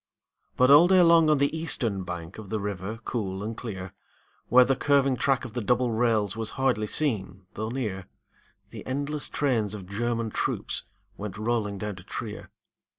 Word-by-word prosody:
But 130 +2 +5
all 150 +5 +8
day 185 0 +6
long 165 -2 +6
on 150 - +4
the 140 +3 +1
eastern 120 - -1
bank 85 +2 -7
Of 105 -3 -10
the 110 - -1
river 100 +1 -4
cool 100 -4 -3
and 110 +2 -4
clear, 95 -6 -7 0.5
Where 125 +1 +7
the 135 +2 +2
curving 135 0 +3
track 135 +1 +1
of 110 - -8
the 120 - -2
double 125 +2 +1
rails 110 -3 +1
Was 110 -1 -3
hardly 125 -6 +1
seen 100 -10 -1
though 110 +1 -4
near, 105 -7 -4 0.6
The - - -8
endless 145 +2 -2
trains 115 -8 0
of 100 -3 -8
German 115 +3 -2
troops - - -2 0.3
Went 100 -1 -6
rolling 110 -2 -1
down 105 0 -5
to 90 - -11
Trier. - - -6
115 Hz, 175 wpm, -27 LUFS, 100-135 Hz, 0.6 s, all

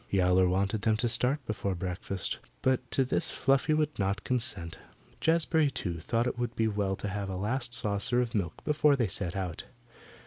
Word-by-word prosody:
Yowler 90 -1 +4
wanted 100 +3 0
them 110 0 +2
to 120 - +1
start 125 +4 0
before 100 -3 -2
breakfast, 90 +1 -3 0.2
but 130 -1 +1
to 135 - +2
this 130 - 0
Fluffy 135 +3 +2
would 150 -3 0
not 100 +1 0
consent. 115 -10 -3 0.4
Jazbury, 160 -2 +3
too, 85 -10 -4
thought 115 +8 0
it 120 - -2
would 120 -1 -2
be 110 - +2
well 100 -2 0
to 105 - -5
have 100 0 -3
a 95 - -3
last 120 +6 -2
saucer 110 +1 0
of 120 -1 0
milk 95 -7 -2
before 150 -1 +4
they 120 -5 +1
set 95 -1 -1
out. 90 -4 -4
110 Hz, 185 wpm, -30 LUFS, 95-130 Hz, 0.4 s, Yowler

